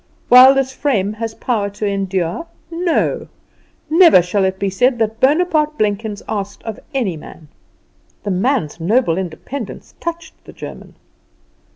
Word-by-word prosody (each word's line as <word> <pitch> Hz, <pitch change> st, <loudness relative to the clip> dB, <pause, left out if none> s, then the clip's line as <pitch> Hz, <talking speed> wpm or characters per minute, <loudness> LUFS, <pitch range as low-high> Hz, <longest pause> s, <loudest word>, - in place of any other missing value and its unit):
While 255 Hz, +2 st, +9 dB
this 265 Hz, -1 st, 0 dB
frame 215 Hz, -8 st, 0 dB
has 225 Hz, 0 st, -5 dB
power 215 Hz, -5 st, -1 dB
to 205 Hz, +1 st, -5 dB
endure, 195 Hz, -, -2 dB, 0.2 s
NO. 340 Hz, 0 st, 0 dB, 0.6 s
Never 325 Hz, -, +6 dB
shall 190 Hz, +2 st, 0 dB
it 190 Hz, 0 st, -1 dB
be 195 Hz, 0 st, -1 dB
said 245 Hz, +6 st, +2 dB
that 220 Hz, 0 st, -1 dB
Bonaparte 300 Hz, +2 st, +2 dB
Blenkins 210 Hz, -1 st, -2 dB
asked 205 Hz, -1 st, -4 dB
of 225 Hz, -2 st, -6 dB
any 240 Hz, -, -1 dB
man.'" 155 Hz, 0 st, -12 dB, 0.7 s
The 205 Hz, -, -2 dB
man's 190 Hz, -, 0 dB
noble 180 Hz, 0 st, +1 dB
independence 195 Hz, -, -7 dB
touched 340 Hz, -1 st, -5 dB
the -, -, -13 dB
German. -, -, -10 dB
220 Hz, 140 wpm, -18 LUFS, 195-270 Hz, 0.7 s, While